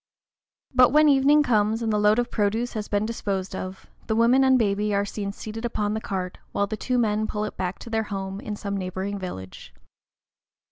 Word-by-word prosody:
But 255 -1 +6
when 305 +2 +5
evening 285 +1 +5
comes, 220 -2 +1
and 220 -1 0
the 210 - +2
load 210 +1 +4
of 245 0 0
produce 220 +3 0
has 215 -3 -4
been 205 +1 0
disposed 195 -4 -3
of, 185 0 -6 0.2
the 220 - 0
woman 240 +4 +5
and 260 -1 +5
baby 210 -2 +1
are 200 0 +1
seen 200 0 -4
seated 215 +2 -7
upon 210 -3 -1
the 220 - -2
cart, 185 -3 -4
while 200 - +1
the 215 - -4
two 250 +3 -1
men 215 -2 +1
pull 210 -1 -3
it - - -6
back 185 0 -3
to - - -10
their 220 -1 0
home 195 -1 -4
in 210 0 -5
some 200 -1 -4
neighboring 190 +1 -3
village. 95 - -8
210 Hz, 205 wpm, -25 LUFS, 200-230 Hz, 0.2 s, But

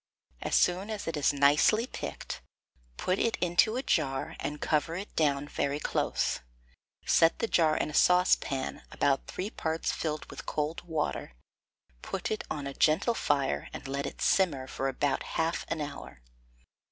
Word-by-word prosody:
As - - 0
soon 185 +4 +2
as 215 -2 -4
it 165 - -1
is 150 - +3
nicely 145 - +4
picked, - - -6 0.6
put 185 +1 0
it 230 - +2
into 180 +5 +3
a 260 - -1
jar, 135 - 0
and 150 +1 -4
cover 160 +2 0
it 195 +3 -7
down 145 -2 +1
very 140 0 -1
close. - - 0 0.7
Set 165 0 +4
the - - 0
jar 160 -7 +3
in 150 - -1
a - - -11
saucepan, 180 -7 +3
about 135 -1 +1
three 200 +4 -4
parts 160 0 -1
filled 155 -2 -3
with - - -10
cold 150 +2 -2
water; 155 - -2 0.7
put 195 +1 -4
it 215 - -2
on 145 -2 -3
a 140 - -4
gentle 160 - +3
fire, 140 - 0
and - - -7
let 140 +1 -2
it - - -9
simmer 155 -9 +2
for 135 +1 -3
about 135 +1 0 0.2
half 165 +1 0
an 155 - -2
hour. 145 - -7
155 Hz, 165 wpm, -30 LUFS, 140-180 Hz, 0.7 s, nicely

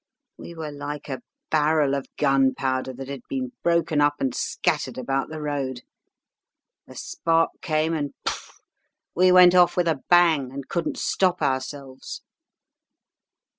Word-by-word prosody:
We 170 - -10
were 155 -2 -6
like 145 0 -7
a 130 - -4 0.3
barrel 150 -2 +2
of 140 -1 -2
gunpowder 135 -2 +1
that 130 +1 -8
had 140 -2 -6
been 130 -2 -3
broken 170 -3 +1
up 145 0 +3
and 130 -3 -1
scattered - - -1
about 135 +2 -2
the 155 0 -6
road. 140 -4 -3 1.1
A - - -13
spark 165 0 0
came, 155 +1 0
and 145 -3 -2
poof! - - -5 0.5
we 185 +1 +4
went 180 -1 +8
off 180 -1 +4
with 175 -1 +2
a 155 -5 0
bang, 165 -7 +4
and 135 0 -7
couldn't 170 -1 -2
stop 180 -3 +1
ourselves. 135 0 -4
145 Hz, 140 wpm, -24 LUFS, 135-165 Hz, 1.1 s, went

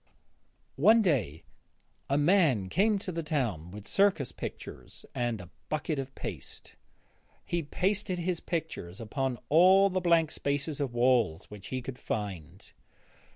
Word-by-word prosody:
One 220 +6 +7
day 115 - 0 0.7
a 140 - +2
man 145 - +3
came 205 - +3
to 190 -1 -5
the 165 -1 -3
town 120 - -2
with 105 +2 -10
circus 195 - +2
pictures - - -8
and 120 -3 -1
a 90 -3 -11 0.2
bucket 155 -1 -1
of 135 0 -6
paste. - - -7 0.7
He 170 - -1
pasted 190 +5 -1
his 175 0 -1
pictures 160 - -4
upon 125 +3 -2
all 190 +5 +6
the 185 0 0
blank 165 -3 +3
spaces 145 +1 -2
of 135 -4 -2
walls 120 -9 +2
which 105 -2 -9
he 130 -1 -4
could 130 0 -7
find. 95 -4 -5
145 Hz, 140 wpm, -29 LUFS, 115-175 Hz, 0.7 s, One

